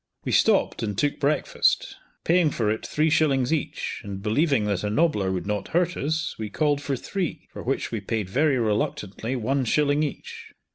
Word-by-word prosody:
We - - -1
stopped - - +3
and 105 -3 -3
took 145 - 0
breakfast, 145 +1 +1 0.3
paying 170 -1 +3
for 110 -6 0
it 110 - -3
three 155 +1 +1
shillings 140 -3 +2
each, 155 - -3
and 100 -2 -6
believing 135 +1 +2
that 100 -2 -1
a 105 - 0
nobbler 105 - +1
would 95 -1 -3
not 105 -1 -2
hurt 175 0 +1
us, 155 +2 -1
we 110 -1 -4
called 145 +4 +1
for 140 -1 -2
three, 180 +6 -4
for - - -7
which - - -2
we - - -3
paid 110 -4 -2
very 140 +7 +2
reluctantly 110 +1 -1
one 130 +3 0
shilling 145 +4 +2
each. 150 -2 -5
135 Hz, 185 wpm, -25 LUFS, 105-150 Hz, 0.3 s, stopped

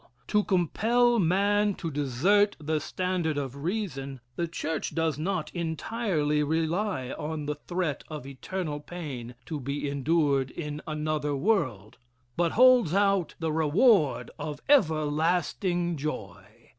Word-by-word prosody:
To 210 0 +3
compel 230 +7 +2
man 200 +3 +2
to 165 -3 -4
desert 150 - +2
the 155 +1 -1
standard 175 -1 -1
of 135 -2 -3
Reason, 155 -9 -3 0.2
the 170 - -1
church 160 -1 -3
does 160 -2 0
not 185 +4 -2
entirely 165 -2 -1
rely 160 -1 -1
on 150 0 -4
the 150 - -1
threat 165 0 -3
of 150 -4 -7
eternal 150 +3 -4
pain 145 -7 -7
to 155 - -4
be 140 +2 -3
endured 140 -1 +1
in 150 0 -5
another 150 -1 -1
world, 135 - 0 0.4
but 170 -1 +1
holds 250 -8 +6
out 195 -3 +2
the 165 -1 -2
reward 160 - +3
of 150 -2 -5
everlasting 175 - +2
joy. 105 -10 -5
160 Hz, 125 wpm, -28 LUFS, 145-185 Hz, 0.4 s, holds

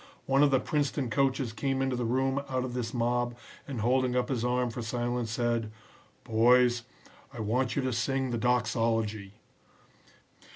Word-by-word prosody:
One 135 +1 +3
of 145 - +6
the 135 -1 +3
Princeton 140 -3 -1
coaches 135 -1 +1
came 135 +4 -1
into 135 -1 0
the 120 -1 -2
room 130 +3 +1
out 130 -1 -1
of 125 - -5
this 120 -2 -3
mob, 120 0 0 0.3
and 130 -6 -4
holding 125 +2 +2
up 125 -1 0
his 125 -4 -1
arm 125 0 0
for 120 - -5
silence 120 0 -2
said, 115 -1 -1 0.5
"'Boys, 120 +2 +4 0.5
I 120 - -10
want 120 +4 0
you 140 - 0
to 130 -1 -1
sing 130 +2 -1
the 120 - -1
doxology.'" 115 -4 0
125 Hz, 165 wpm, -29 LUFS, 115-130 Hz, 0.5 s, of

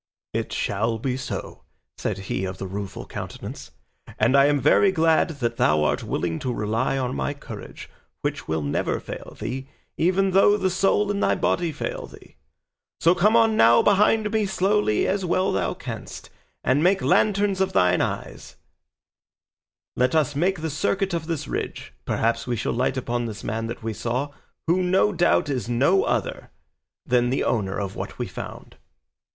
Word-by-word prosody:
"It - - -2
shall 115 +3 -1
be 125 +3 -2
so," 130 -1 -6 0.3
said - - -3
he 95 -1 -3
of 95 0 -4
the - - -5
Rueful 100 +1 -6
Countenance, - - -7 0.5
"and 115 +5 +3
I 140 0 +7
am 145 -1 +2
very 155 +8 +4
glad 165 -1 +3
that 115 -1 -1
thou 75 0 +3
art 75 -1 +1
willing 80 -2 -2
to 130 - -2
rely 115 +4 -1
on 130 - -2
my 65 -1 -2
courage, - - -9 0.3
which - - -3
will 80 -1 -1
never 70 - -1
fail - - -9
thee, 130 +5 -4 0.3
even 190 +3 +2
though 195 +2 +5
the 190 -2 0
soul 195 +2 +2
in 200 - -2
thy - - +2
body 170 -1 0
fail - - -5
thee; - - -16 0.6
so 170 - +5
come 205 +5 +3
on 225 -1 +4
now 115 - +6
behind 210 +1 +3
me 220 -2 +1
slowly 190 - +1
as 195 0 0
well 185 +1 +1
as - - -1
thou 90 -3 -1
canst, - - -8 0.3
and 135 +3 +2
make 185 +3 +3
lanterns 200 -2 +2
of 190 - 0
thine 90 -1 +3
eyes; - - -4 1.4
let 125 +4 +2
us 150 -2 +2
make 180 +3 +1
the 160 -1 -2
circuit 195 +5 0
of 165 -2 -2
this 155 -4 -3
ridge; - - -5
perhaps 115 +2 0
we 120 - 0
shall 110 - -2
light 130 +2 0
upon 120 -1 -2
this 110 -2 -7
man 115 +1 -2
that 120 0 -7
we 115 0 -2
saw, 125 +7 -2 0.3
who 175 +3 +2
no 185 +3 +2
doubt 175 -3 +2
is 130 -4 -2
no 140 +11 +3
other - - -2 0.6
than 120 -1 +2
the 130 - 0
owner 100 -4 -1
of 100 -2 -4
what - - -6
we - - -2
found." - - -9
135 Hz, 180 wpm, -24 LUFS, 115-185 Hz, 1.4 s, I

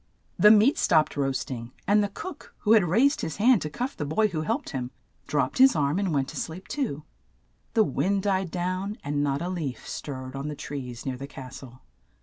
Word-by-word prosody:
The 210 - +8
meat 220 +6 +6
stopped 155 -2 +3
roast 135 -2 -1
ing, 115 -1 -6
and 205 +1 +4
the 205 - -1
cook, 370 - -9
who 210 - +1
had 215 -5 +6
raised 245 - +3
his 160 - -3
hand 230 +1 +5
to 150 - -3
cuff 250 - -4
the - - -4
boy 160 +9 +1
who 160 -5 -2
helped 230 - -2
him, 125 -2 -3 0.4
dropped - - 0
his 265 0 +7
arm 150 +3 +1
and 195 -3 0
went 140 -3 +1
to - - -8
sleep 170 +4 -5
too. 195 - -3 0.7
The 220 - +6
wind 200 -1 0
died 190 -3 0
down, 185 +4 -2
and 145 0 -1
not 140 +2 0
a - - -2
leaf 150 -10 -4
stirred 130 -2 -6
on 135 +2 -4
the 150 - -4
trees 125 -5 -6
near 130 -2 -3
the 140 +2 -7
cas 130 -2 -9
tle. 130 -1 -13
160 Hz, 215 wpm, -26 LUFS, 140-205 Hz, 0.7 s, The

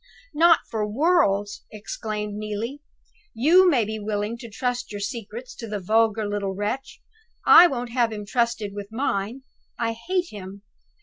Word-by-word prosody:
"Not 330 +1 +5
for 220 -2 -2
worlds!" 210 - +2
exclaimed 210 0 -5
Neelie. 215 +6 -4 0.5
"You 345 +10 +6
may 250 -9 +3
be 220 +1 -4
willing 210 +1 -2
to 235 - -9
trust 245 +2 -3
your 205 - -5
secrets 230 +2 -6
to 230 - -7
the 210 -1 -3
vulgar 220 +2 +2
little 200 -2 -2
wretch; 210 +7 -4 0.4
I 355 - +9
won't 245 -5 -4
have 235 -2 +1
him 210 -1 -6
trusted 230 -2 -1
with 205 -1 -6
mine. 225 0 -2 0.3
I 230 -1 0
hate 355 +9 -2
him. 200 -1 -9
220 Hz, 150 wpm, -24 LUFS, 205-250 Hz, 0.5 s, I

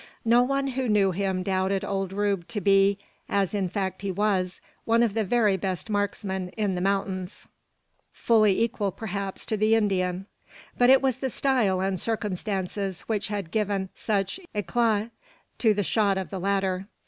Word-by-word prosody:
No 235 +2 +5
one 275 +2 0
who 260 -1 -2
knew 200 -2 +3
him 190 0 -1
doubted 190 0 0
old 195 -1 -2
Rube 200 -3 -1
to 210 - -3
be, 195 0 +4 0.3
as 200 -1 +1
in 195 -3 0
fact 190 0 -3
he 200 - -3
was, 190 -2 0 0.2
one 230 +1 +3
of 225 -4 +1
the 220 0 +1
very 210 -1 +2
best 190 +2 -3
marksmen 195 -2 -2
in 205 -3 0
the 180 - -2
mountains 195 -1 -2 0.6
fully 215 -4 +3
equal, 220 -4 -1
perhaps, 200 -2 -5
to 220 - -1
the 215 +2 +3
Indian; 190 -3 0 0.5
but 245 0 +4
it 265 +1 +6
was 260 -2 +1
the 265 - -1
style 230 -9 +1
and 190 -1 -1
circumstances 195 -3 -2
which 220 -1 -2
had 200 -6 -4
given 200 -2 -1
such 200 - -1 0.2
eclat 215 +3 +1 0.5
to 225 - +4
the 205 -1 +1
shot 200 0 +2
of 190 - -4
the 190 - -4
latter. 195 0 -1
200 Hz, 170 wpm, -26 LUFS, 190-220 Hz, 0.6 s, it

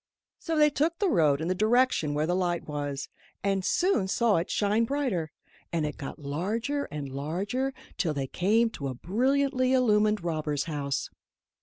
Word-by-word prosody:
So 325 -2 -2
they 300 -1 +5
took 320 +4 0
the 400 -2 +1
road 155 -5 +3
in 160 - -2
the 185 - +2
direction 215 - +2
where 150 +1 +1
the 175 - 0
light 175 -2 -1
was, 145 -2 -3 0.4
and 195 -1 +1
soon 345 - +2
saw 225 +1 +2
it 165 - -2
shine 210 +2 +2
brighter; 230 - -1 0.4
and 165 -2 0
it 150 - -4
got 135 - -6
larger 210 - -2
and 145 -2 -6
larger 180 - -2 0.3
till 160 -4 0
they 135 -1 -1
came 220 - +2
to 140 -9 -5
a 130 - -4
brilliantly 255 - +1
illumined 215 -5 +3
robber's 155 -4 -1
house. 145 -4 -3
190 Hz, 170 wpm, -28 LUFS, 150-250 Hz, 0.4 s, they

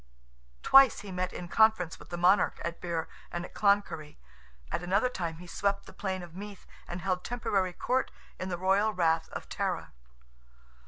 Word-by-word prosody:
Twice 270 -3 +7
he 205 -2 -8
met 185 0 -2
in 175 - -7
conference 220 -4 +3
with - - -14
the 175 - -4
monarch 180 +2 +3
at 170 0 -4
Birr 170 -2 -2 0.2
and 175 0 -3
at - - -13
Cloncurry—at 110 - -2
another 195 +7 +2
time 170 -8 -4
he 180 - -11
swept 200 +3 -1
the - - -13
plain 190 -2 -3
of 170 -2 -11
Meath, 200 0 -9 0.2
and 175 +1 -5
held 185 -1 -1
temporary 200 -6 -1
court 255 +8 0 0.3
in 185 - -3
the 175 - -2
royal 195 +4 +2
rath 165 -2 +2
of - - -7
Tara. - - -2
185 Hz, 170 wpm, -30 LUFS, 170-200 Hz, 0.3 s, Twice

